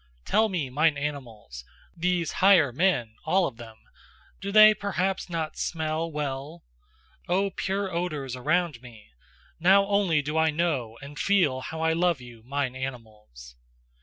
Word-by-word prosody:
Tell 220 0 +2
me, 160 -9 -3
mine 155 +2 +2
animals: 120 - -6 0.3
these 175 -1 0
higher 185 -8 +6
men, 145 -8 +1
all 185 +3 +2
of 125 -8 -5
them 115 -2 -11 0.6
do 200 +1 -5
they 215 +1 +8
perhaps 195 -2 -2
not 165 -2 -4
SMELL 160 0 -2
well? 150 +2 -5 0.7
O 195 +2 +1
pure 190 0 -3
odours 150 -7 -3
around 155 0 0
me! 115 - -15 0.5
Now 195 +4 +5
only 195 -7 +1
do 150 +2 -1
I 160 0 +3
know 150 -8 -1
and 145 +1 -9
feel 175 -10 +2
how 160 +4 -6
I 160 0 +2
love 170 -2 +1
you, 120 -2 -13
mine 130 +1 -3
animals." 110 - -9
155 Hz, 145 wpm, -26 LUFS, 130-180 Hz, 0.7 s, they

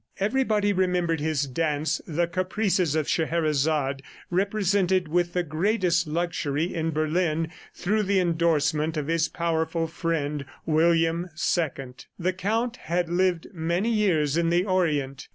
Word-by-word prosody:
Everybody 210 -2 +1
remembered 180 -3 +1
his 150 -2 0
dance, 150 +2 -1
"The 170 +2 +1
Caprices 185 -2 0
of 155 -2 0
Scheherazade," 155 -4 0 0.3
represented 190 -1 +1
with 175 +2 0
the 180 - +1
greatest 175 +1 +1
luxury 165 -1 -1
in 165 -1 -1
Berlin 160 +1 0 0.2
through 210 +4 0
the 200 -1 +2
endorsement 160 -2 +1
of 150 - -1
his 165 +1 +1
powerful 165 -1 -1
friend, 160 -3 -2 0.2
William 165 +2 +2
II. 140 -6 -1 0.2
The 180 +1 0
Count 225 +6 -1
had 170 +1 -2
lived 175 -1 +1
many 170 +6 0
years 165 -9 +2
in 170 -1 +2
the 175 +2 +2
Orient. 150 -8 0
170 Hz, 130 wpm, -26 LUFS, 155-185 Hz, 0.3 s, the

